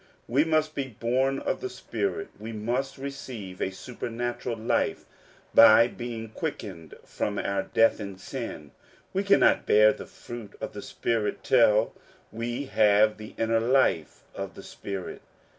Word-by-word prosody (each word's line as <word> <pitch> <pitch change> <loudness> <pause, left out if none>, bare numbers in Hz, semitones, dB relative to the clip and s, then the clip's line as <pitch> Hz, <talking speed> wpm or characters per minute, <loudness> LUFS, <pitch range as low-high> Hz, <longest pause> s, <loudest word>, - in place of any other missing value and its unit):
We 135 +5 +3
must 155 -1 +1
be 140 -3 -3
born 130 +3 +1
of - - -2
the 390 - -3
Spirit; 400 +1 -3
we 110 +1 -6
must 120 +6 -2
receive 130 -9 -7
a - - +1
supernatural 120 +3 -4
life 110 +1 0 0.5
by 115 +1 +8
being 115 -2 -6
quickened 95 - -6
from 105 -1 -3
our 100 -1 0
death 115 +3 +3
in 100 -3 -6
sin. 75 -5 -7 0.4
We 190 - +1
cannot 200 0 +4
bear 105 0 +6
the - - -9
fruit 120 -4 -9
of - - -5
the - - -6
Spirit 115 -3 -2
till 115 -3 +4 0.4
we 120 +5 -3
have 105 -3 +4
the 110 - -10
inner 115 0 +2
life 115 - +1
of - - -6
the - - -10
Spirit. 100 -2 -6
115 Hz, 145 wpm, -27 LUFS, 105-135 Hz, 0.5 s, by